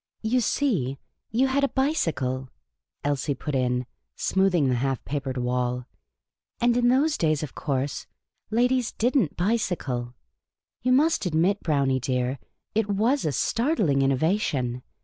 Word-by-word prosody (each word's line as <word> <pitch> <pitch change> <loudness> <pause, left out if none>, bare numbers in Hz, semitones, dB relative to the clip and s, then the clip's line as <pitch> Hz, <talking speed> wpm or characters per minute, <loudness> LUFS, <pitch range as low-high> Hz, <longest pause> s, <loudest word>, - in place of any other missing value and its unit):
" - - -55
You 255 - +4
see, 180 - 0 0.3
you 240 +5 +2
had 270 +1 +1
a 280 - +3
bicycle," 150 - -1 0.5
Elsie 145 0 0
put 150 +3 -5
in, 125 -1 0 0.3
smoothing 190 -6 +2
the 130 - +2
half 135 +1 -1
papered 135 -3 -3
wall; 125 0 -1 0.4
" - - -60
and 240 0 +3
in 240 0 +3
those 285 +5 +3
days, 155 -2 +1
of 145 - -6
course, 140 -1 -2 0.4
ladies 245 +2 +2
did 245 +5 0
n't 200 - +2
bicycle. 170 - -1 0.7
You 255 - +1
must 300 - +3
admit, 175 +5 +1
Brownie, 140 -4 +1
dear, 125 0 -1 0.3
it 220 -1 +1
7c>as 225 +8 +1
a - - +1
startling 210 - +1
innovation. 135 - +1
155 Hz, 145 wpm, -25 LUFS, -, 0.7 s, You